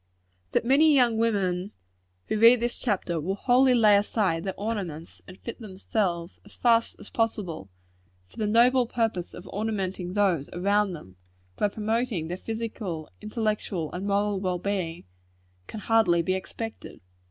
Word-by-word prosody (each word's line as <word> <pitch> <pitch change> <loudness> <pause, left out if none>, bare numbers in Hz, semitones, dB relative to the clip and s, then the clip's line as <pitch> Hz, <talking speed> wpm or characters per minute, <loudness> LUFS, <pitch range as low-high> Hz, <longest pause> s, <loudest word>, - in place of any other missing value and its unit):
That - - +2
many 295 +4 +5
young 240 -4 +3
women, 195 -4 0 0.5
who 215 - -1
read 230 +2 +7
this 240 +1 -1
chapter, 185 -7 -1
will 190 +5 -2
wholly 250 +3 +4
lay 215 -3 +6
aside 200 -5 +1
their 190 -2 -5
ornaments, 190 -7 -4
and 185 - -11
fit 235 - -8
themselves, 190 -4 -3
as 205 - -14
fast 230 -1 +2
as - - -12
possible, 190 - -2 0.6
for - - -22
the 215 -2 -1
noble 240 +3 +4
purpose 225 -7 -2
of 180 - -10
ornamenting 195 -4 -3
those 190 -8 +1
around 200 +2 +1
them, 95 - -11 0.4
by 210 - +1
promoting 215 -4 -2
their 180 - -3
physical, 215 -7 -5
intellectual 210 -6 -2
and 185 +3 -4
moral 200 0 +1
well 185 -2 -1
being, 180 -3 -3 0.6
can 215 - -7
hardly 195 -7 +3
be 185 - 0
expected. 225 +4 -6
205 Hz, 150 wpm, -26 LUFS, 180-225 Hz, 0.6 s, read